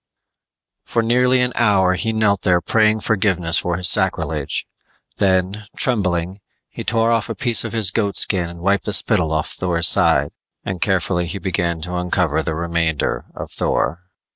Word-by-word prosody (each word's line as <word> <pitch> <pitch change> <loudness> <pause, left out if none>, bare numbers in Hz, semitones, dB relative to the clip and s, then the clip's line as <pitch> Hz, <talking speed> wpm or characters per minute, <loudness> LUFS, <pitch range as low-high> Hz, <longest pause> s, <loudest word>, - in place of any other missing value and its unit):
_ - - -24
For 115 - 0
nearly 125 +2 +2
an 125 0 0
hour 100 -5 +2
he 110 +5 -1
knelt 105 -3 +1
there 90 -3 +2
praying 110 +5 +1
forgiveness 95 -6 +1
for 85 -1 -2
his 90 -1 +3
sacrilege. 75 -5 0 0.5
Then, 95 +2 0
trembling, 95 -6 0 0.3
he - - -7
tore 115 0 +1
off 115 -4 0
a - - -4
piece 120 -7 +3
of - - -5
his 110 -5 +2
goatskin 100 -4 +1
and 85 0 -11
wiped 100 +2 0
the 105 - -2
spittle 90 -6 +2
off 80 0 -2
Thor's 85 -2 +1
side, - - +3 0.5
carefully 90 -2 0
began 85 -3 -2
to 90 +3 -6
uncover 90 -3 0
the 80 0 -4
remainder 85 -2 -2
of - - -8
Thor. 75 +8 -1
95 Hz, 160 wpm, -19 LUFS, 85-110 Hz, 0.5 s, his